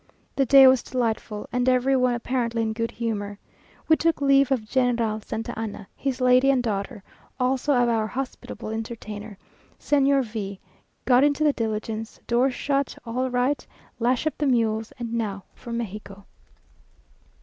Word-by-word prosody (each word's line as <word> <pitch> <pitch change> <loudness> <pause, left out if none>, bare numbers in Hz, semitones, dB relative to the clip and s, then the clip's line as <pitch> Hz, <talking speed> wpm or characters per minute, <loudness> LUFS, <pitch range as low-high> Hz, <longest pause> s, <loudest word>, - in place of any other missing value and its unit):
The 270 -2 +1
day 270 +1 +9
was 260 -1 +6
delightful, 225 -4 -2
and 250 +2 +1
every 255 +1 +3
one 250 -1 +2
apparently 235 -1 -1
in 220 0 -1
good 230 +1 -2
humour. 205 -3 -4 0.5
We 315 - +6
took 330 -1 +1
leave 275 -1 +4
of 245 -5 +1
General 235 -4 +1
Santa 225 +2 -5
Anna, 210 -3 -6
his 270 -2 -3
lady 255 +1 +5
and 260 -2 +3
daughter, 205 -1 -3 0.4
also 265 +3 +1
of 245 -1 +3
our 225 -2 +1
hospitable 255 -2 -6
entertainer, 220 -2 -6 0.4
Señor 275 -1 +3
V 205 -4 -6
o; - - -34 0.4
got 250 +1 +5
into 290 +1 +2
the 295 -2 +4
diligence 220 -1 -4
doors 250 +2 +2
shut 275 -1 -1
all 250 +3 -1
right 250 +3 0 0.3
lash 245 +4 +1
up 310 - 0
the 295 - +1
mules, 225 -3 +1
and 235 -2 -5
now 205 -4 -2
for 235 - -10
Mexico! 205 -3 -6
240 Hz, 160 wpm, -25 LUFS, 220-260 Hz, 0.5 s, day